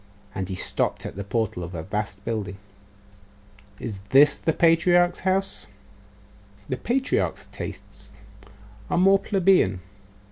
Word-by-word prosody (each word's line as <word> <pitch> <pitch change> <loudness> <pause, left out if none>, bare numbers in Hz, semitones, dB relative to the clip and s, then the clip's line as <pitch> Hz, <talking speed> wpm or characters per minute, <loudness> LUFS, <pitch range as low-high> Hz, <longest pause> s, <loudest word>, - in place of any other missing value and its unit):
And 95 0 -4
he 95 - -3
stopped 90 - 0
at - - -6
the 100 - -5
portal 100 -3 -2
of 85 +1 -7
a 80 - -5
vast 100 0 -4
building. 105 -4 -3 1.2
'Is 105 -5 -5
this 145 +2 +6
the 160 - 0
patriarch's 175 +2 +3
house?' 190 +1 -1 1.0
'The 130 - -2
patriarch's 265 - -1
tastes - - -9 0.8
are - - 0
more 195 +2 +5
plebeian. 185 - +2
130 Hz, 120 wpm, -24 LUFS, -, 1.2 s, this